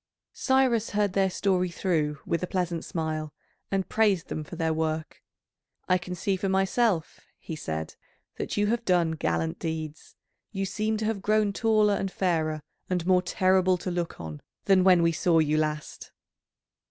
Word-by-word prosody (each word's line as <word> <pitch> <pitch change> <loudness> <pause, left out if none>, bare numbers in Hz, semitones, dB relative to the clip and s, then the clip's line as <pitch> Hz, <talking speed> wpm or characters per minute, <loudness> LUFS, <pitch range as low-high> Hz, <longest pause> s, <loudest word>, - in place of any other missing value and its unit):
Cyrus 260 -4 +2
heard 205 -2 +1
their 195 -1 +2
story 185 -1 +1
through 160 -4 0
with 170 - -1
a 180 - -2
pleasant 175 -3 -2
smile, 155 -2 -3 0.4
and 195 -1 -1
praised 205 -6 +2
them 155 - -3
for 150 - -9
their 160 -1 0
work. 160 0 -3 0.7
"I 185 0 +3
can 180 +1 -6
see 195 +2 0
for 195 +1 -2
myself," 195 -1 +1 0.2
he 160 - -7
said, 80 - -4 0.4
"that - - -4
you 205 - +3
have 235 +3 0
done 175 -5 +2
gallant 80 - -1
deeds. 160 -2 -5 0.4
You 195 -2 -2
seem 215 +3 -1
to 215 - -2
have 215 -2 -1
grown 210 0 +2
taller 215 -1 +3
and 195 -1 -2
fairer 160 -5 0 0.3
and 180 -2 -1
more 180 0 +4
terrible 185 0 +2
to 180 +1 -4
look 175 -1 -3
on 80 -3 -7 0.2
than 190 -2 +5
when 180 -2 +6
we 165 - +4
saw 165 +1 +2
you 155 -1 +3
last." 150 -1 -3
180 Hz, 170 wpm, -27 LUFS, 160-195 Hz, 0.7 s, when